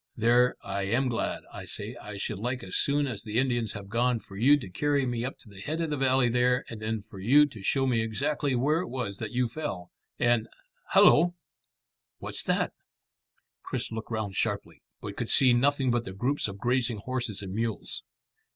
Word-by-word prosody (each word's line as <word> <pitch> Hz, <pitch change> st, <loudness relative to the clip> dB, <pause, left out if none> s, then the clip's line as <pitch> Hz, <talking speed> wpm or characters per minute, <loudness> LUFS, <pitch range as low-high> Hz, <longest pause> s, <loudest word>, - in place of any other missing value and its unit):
There, 120 Hz, +2 st, +4 dB
I 100 Hz, 0 st, -2 dB
am 125 Hz, +5 st, +1 dB
glad. 115 Hz, -, -2 dB
I -, -, -7 dB
say, -, -, -5 dB
I 105 Hz, -1 st, -8 dB
should 100 Hz, 0 st, -3 dB
like 125 Hz, +3 st, -2 dB
as 95 Hz, -, -5 dB
soon 145 Hz, +1 st, +2 dB
as 120 Hz, -7 st, -4 dB
the 110 Hz, +1 st, -4 dB
Indians 120 Hz, -3 st, +1 dB
have 100 Hz, -1 st, -7 dB
gone, 120 Hz, +3 st, +1 dB
for 100 Hz, -, -14 dB
you 135 Hz, +8 st, +5 dB
to 125 Hz, -, -7 dB
carry 140 Hz, +8 st, 0 dB
me 120 Hz, -2 st, -2 dB
up 130 Hz, -, -4 dB
to -, -, -12 dB
the 100 Hz, -2 st, -12 dB
head 155 Hz, +9 st, -3 dB
of 165 Hz, -2 st, -1 dB
the -, -, +1 dB
valley 130 Hz, -2 st, +3 dB
there, 125 Hz, +1 st, +2 dB
and 110 Hz, -2 st, -7 dB
then 110 Hz, -1 st, -2 dB
for 95 Hz, -, -11 dB
you 135 Hz, +10 st, +6 dB
to 125 Hz, -8 st, -9 dB
show 135 Hz, +7 st, +1 dB
me 120 Hz, -3 st, +2 dB
exactly 130 Hz, +5 st, -1 dB
where 145 Hz, +6 st, +2 dB
it 180 Hz, -, -3 dB
was 120 Hz, -6 st, -4 dB
that 110 Hz, -, -4 dB
you 125 Hz, 0 st, 0 dB
fell, 115 Hz, -, -5 dB, 0.3 s
and 120 Hz, -2 st, +2 dB, 0.5 s
Hallo! 175 Hz, +3 st, +6 dB, 0.8 s
What's -, -, -5 dB
that?" -, -, +1 dB, 0.9 s
Chris -, -, -4 dB
looked 110 Hz, 0 st, -5 dB
round 110 Hz, -4 st, -3 dB
sharply, -, -, -2 dB, 0.2 s
but -, -, -6 dB
could -, -, -3 dB
see 130 Hz, -3 st, +7 dB
nothing 135 Hz, +1 st, +2 dB
but 120 Hz, 0 st, +1 dB
the 95 Hz, -, -7 dB
groups 125 Hz, +8 st, 0 dB
of 100 Hz, -1 st, -7 dB
grazing 120 Hz, 0 st, 0 dB
horses 120 Hz, -3 st, -3 dB
and 95 Hz, -1 st, -6 dB
mules. 115 Hz, 0 st, -2 dB
120 Hz, 205 wpm, -28 LUFS, 105-130 Hz, 0.9 s, see